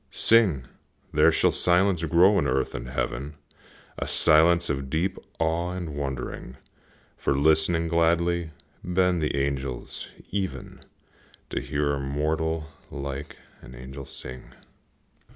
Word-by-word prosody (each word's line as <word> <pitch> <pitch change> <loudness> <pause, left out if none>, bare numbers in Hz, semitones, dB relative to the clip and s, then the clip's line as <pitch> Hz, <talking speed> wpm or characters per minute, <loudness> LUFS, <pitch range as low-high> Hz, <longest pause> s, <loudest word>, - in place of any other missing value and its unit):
Sing! 95 - +4 0.5
there - - +5
shall - - +3
silence 90 0 +3
grow 90 +5 +5
in 70 - 0
earth 65 0 0
and - - -6
heaven, 65 +3 -3 0.6
A - - -3
silence 85 +2 +4
of 70 -2 -3
deep 85 +6 -1 0.2
awe 85 +2 0
and 90 -4 -5
wondering; 65 -2 -5 0.6
For, 70 - 0
listening 80 +3 +3
gladly, 85 0 +1 0.3
bend 90 -1 +1
the 75 -2 -1
angels, 70 -2 -3 0.2
even, 95 -2 -4 0.7
To - - -2
hear 75 -1 -1
a 70 - -2
mortal 75 +3 -1 0.2
like 70 0 -6 0.2
an 65 +1 -12
angel 65 +3 -9
sing. 65 -1 -9
80 Hz, 120 wpm, -26 LUFS, 70-85 Hz, 0.7 s, there